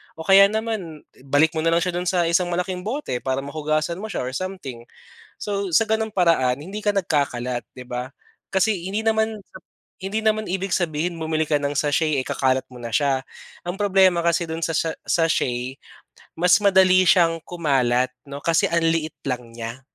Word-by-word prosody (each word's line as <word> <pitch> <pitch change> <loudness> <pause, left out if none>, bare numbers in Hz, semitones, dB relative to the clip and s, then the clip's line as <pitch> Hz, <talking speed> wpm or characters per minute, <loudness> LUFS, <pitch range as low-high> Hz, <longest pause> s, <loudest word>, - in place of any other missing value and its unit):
o 160 - -7
kaya 195 0 +8
naman 210 -7 -4 0.2
ibalik 145 +3 +3
mo - - 0
na 165 - 0
lang 170 - +3
siya 180 - -1
do'n 180 +1 -2
sa 180 -2 +2
isang 175 +2 +2
malaking 180 +1 -2
bote 275 +8 -3
para 130 0 -1
mahugasan 155 +3 -2
mo 215 - -5
siya 220 - -3
or 130 - -4
something. 160 -10 -6 0.6
So 200 -2 -3
sa 195 - +5
gano'ng 220 0 0
paraan 160 -8 +2
hindi 195 +7 -6
ka 205 - +3
nagkakalat 125 -9 -1
'di 125 - -9
ba 125 +1 -5 0.4
kasi 190 -1 +1
hindi 200 +3 -2
naman 220 -1 +1 0.6
hindi 195 +3 -2
naman 215 0 +2
ibig 190 0 -1
sabihin 170 0 -1
bumili 160 -1 -1
ka 150 - +2
ng 145 0 -1
sachet 150 0 +1
eh 130 - -3
kakalat 130 0 +1
mo - - -13
na 115 -1 -6
siya. 135 +1 +1 0.4
Ang 175 +3 -4
problema 190 -3 +4
kasi 170 0 +2
do'n 160 0 -3
sa 165 - -2
sa 165 +2 0 0.2
sachet 130 -6 0 0.6
mas 180 +2 +4
madali 190 -2 +5
siyang 165 -2 +4
kumalat 130 -7 +1 0.2
'no 140 0 -6
kasi 165 -1 +2
ang 170 0 +1
liit 165 -1 -1
lang 125 -3 -3
niya. 115 +2 -6
165 Hz, 185 wpm, -22 LUFS, 140-190 Hz, 0.6 s, kaya